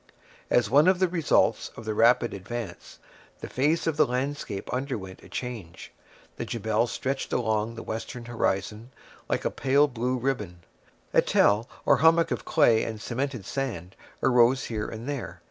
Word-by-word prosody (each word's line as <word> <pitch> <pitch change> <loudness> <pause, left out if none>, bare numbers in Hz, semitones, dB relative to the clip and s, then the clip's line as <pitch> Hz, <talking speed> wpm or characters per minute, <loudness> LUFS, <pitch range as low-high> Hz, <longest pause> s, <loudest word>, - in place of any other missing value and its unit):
As 120 -3 +3
one 145 - +5
of 185 0 +5
the 185 0 +2
results 170 -4 +2
of 115 - -9
the 110 - -1
rapid 120 +2 +4
advance, 100 0 -7 0.4
the - - -5
face 150 +6 +1
of 160 -3 0
the - - +4
landscape 125 -5 -3
underwent 125 -8 -4
a - - -15
change. 115 -10 -7 0.5
The - - -3
Jebel 110 +1 0
stretched 135 +3 -3
along 110 -1 0
the 115 - -7
western 115 +2 -6
horizon, 110 -1 -2 0.4
like - - -1
a - - +1
pale 140 +2 +3
blue 125 0 -2
ribbon. 105 -9 -3 0.5
A - - +6
tell, 105 +5 +3 0.2
or - - +5
hummock 165 +2 +4
of - - -3
clay 115 -7 +4
and 110 -1 -4
cemented 125 -1 -3
sand, 100 -11 -4 0.3
arose 125 +1 +4
here 110 -2 -3
and 115 +3 -7
there. 110 -12 -5
120 Hz, 165 wpm, -27 LUFS, 110-135 Hz, 0.5 s, A